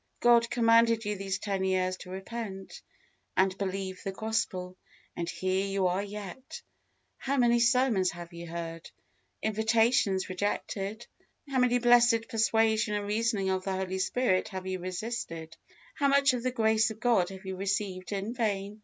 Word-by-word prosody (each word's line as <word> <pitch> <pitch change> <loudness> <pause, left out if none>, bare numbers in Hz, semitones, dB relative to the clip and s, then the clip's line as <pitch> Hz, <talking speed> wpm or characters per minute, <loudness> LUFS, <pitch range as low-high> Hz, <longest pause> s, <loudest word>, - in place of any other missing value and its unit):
God 235 -1 +5
commanded 230 -1 +4
you 210 0 -1
these 195 -1 -3
ten 195 -1 -2
years 185 -1 +1
to 180 - -11
repent, 195 0 -7 0.6
and 190 0 +3
believe 190 -1 -3
the 195 - -3
Gospel, 190 -3 -2 0.4
and 170 0 -3
here 185 +1 -1
you 195 -1 0
are 180 +2 +1
yet. 205 +5 -8 0.6
How 275 +1 -1
many 240 -1 +4
sermons 235 -6 +3
have 175 0 -9
you 170 0 -8
heard? 165 0 -6 0.5
invitations 220 -2 +2
rejected? 200 +3 -3 0.4
How 270 -2 0
much 245 0 +3
blessed 240 -1 +5
persuasion 220 -1 +2
and 205 0 -2
reasoning 210 -2 0
of 185 0 -1
the 195 - -2
Holy 190 0 -2
Spirit 190 -1 +1
have 190 -2 -6
you 185 0 -3
resisted? 175 -3 -5 0.4
how 285 - +1
much 280 -1 +4
of 250 - -2
the 255 - 0
grace 220 -2 +2
of 220 -1 -8
God 225 -7 +2
have 190 0 -10
you 190 0 -4
received 195 -1 -2
in 200 +3 -3
vain? 210 -3 -2
205 Hz, 160 wpm, -29 LUFS, 185-230 Hz, 0.6 s, God